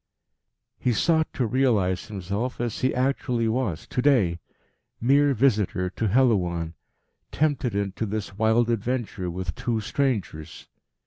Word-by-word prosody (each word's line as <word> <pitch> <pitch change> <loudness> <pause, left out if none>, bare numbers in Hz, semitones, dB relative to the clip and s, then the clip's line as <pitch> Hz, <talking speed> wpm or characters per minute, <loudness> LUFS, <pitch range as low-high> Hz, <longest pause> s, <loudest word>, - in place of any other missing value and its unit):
He 125 - +1
sought 160 +5 +2
to 125 - 0
realise 110 -7 +1
himself 100 +5 -4
as 120 -2 -2
he 130 - +2
actually 125 -2 0
was 110 -7 -1
to 125 - -2
day 110 -12 +3 0.6
mere 140 +3 +3
visitor 105 -7 +1
to 110 - -1
Helouan, 90 -9 +2 0.6
tempted 140 -7 0
into 100 +2 -2
this 105 -1 -4
wild 110 +2 +2
adventure 115 -4 -2
with 90 -1 -4
two 115 -3 -2
strangers. 105 - -3
115 Hz, 125 wpm, -25 LUFS, 95-130 Hz, 0.6 s, day